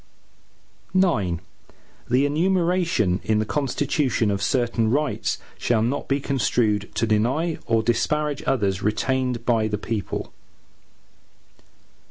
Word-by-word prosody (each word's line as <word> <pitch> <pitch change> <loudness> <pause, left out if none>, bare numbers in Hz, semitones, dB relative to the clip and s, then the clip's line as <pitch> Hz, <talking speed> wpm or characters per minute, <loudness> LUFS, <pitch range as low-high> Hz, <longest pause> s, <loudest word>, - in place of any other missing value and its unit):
IX 100 - +2 0.7
The 130 +4 +3
enumeration 170 - +1
in 110 +2 +1
the 110 - +1
Constitution, 135 -3 0
of 100 0 -2
certain 120 -1 +1
rights, 145 +5 0 0.2
shall 115 -2 +1
not 125 +5 -1
be 140 +1 +1
construed 115 -7 0
to - - +1
deny 125 +10 +1
or 115 -1 +2
disparage 150 +5 0
others 100 -7 +1
retained 125 +3 0
by 115 -3 +2
the 105 -1 -2
people. 105 -1 -4
120 Hz, 110 wpm, -23 LUFS, 110-145 Hz, 0.7 s, The